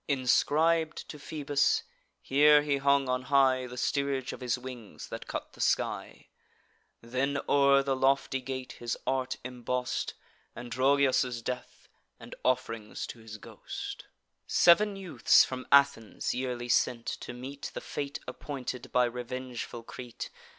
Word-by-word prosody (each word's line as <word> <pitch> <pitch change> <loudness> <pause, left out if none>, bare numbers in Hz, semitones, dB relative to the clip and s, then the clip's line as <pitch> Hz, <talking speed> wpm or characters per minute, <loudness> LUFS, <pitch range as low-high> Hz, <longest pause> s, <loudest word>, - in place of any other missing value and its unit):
Inscrib'd 155 +4 +2
to 150 - -8
Phoebus, 145 - +1 0.4
here 150 +2 +6
he 145 -1 +1
hung 140 0 +3
on 125 0 0
high 130 -1 +3
The 125 0 -9
steerage 140 0 -1
of - - -9
his 125 -1 0
wings, 125 -4 -9
that - - -7
cut - - -5
the - - -9
sky: - - -1 0.7
Then 130 +4 -1
o'er 140 -1 +5
the 135 -1 0
lofty 135 0 +1
gate 130 0 -5
his 120 -1 -3
art 130 -1 -1
emboss'd 125 0 -2 0.4
Androgeos' 130 0 +2
death, 125 +1 -6 0.3
and - - -10
off'rings 115 -4 -1
to 120 - -8
his 110 -1 -9
ghost; - - -8 0.4
Sev'n 205 +4 +5
youths 180 -11 +4
from 130 -1 -6
Athens 140 -5 +3
yearly 125 -1 -3
sent, 120 0 +2
to - - -5
meet 130 +3 -7
The - - -2
fate 140 0 -5
appointed 130 -3 -6
by 125 0 +4
revengeful 125 0 -5
Crete. 120 0 -8
130 Hz, 135 wpm, -30 LUFS, 125-140 Hz, 0.7 s, here